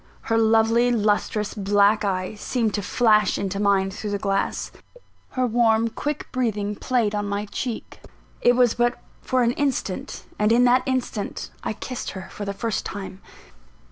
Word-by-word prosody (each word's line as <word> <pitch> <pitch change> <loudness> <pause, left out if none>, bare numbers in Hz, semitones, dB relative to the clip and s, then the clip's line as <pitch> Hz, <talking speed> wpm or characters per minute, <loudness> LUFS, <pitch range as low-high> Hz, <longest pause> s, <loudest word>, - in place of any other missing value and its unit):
Her 225 - 0
lovely 225 +2 +4
lustrous 210 -1 0
black 205 +1 +3
eye 185 -1 -1
seemed 220 0 -1
to 205 - -1
flash 215 0 +3
into 195 0 -3
mine 195 -1 +2
through 210 +2 -5
the 205 - -1
glass; 195 0 -1 0.6
her 255 -1 +1
warm, 230 -1 +3
quick 295 +6 -4
breathing 210 -5 -1
played 235 -2 0
on 205 -1 -1
my 200 +1 -2
cheek 230 +3 -5 0.4
it 245 0 +5
was 245 -2 +4
but 240 0 +1 0.2
for 255 -1 +1
an 235 - +3
instant, 260 -8 -2 0.2
and 210 +1 +3
in 240 +2 +5
that 250 +1 +5
instant 255 -5 -3
I - - -2
kissed 255 +3 -5
her 190 0 -8
for 205 - -6
the 200 - -2
first 225 +1 -2
time. 195 -1 -7
215 Hz, 165 wpm, -23 LUFS, 205-240 Hz, 0.6 s, it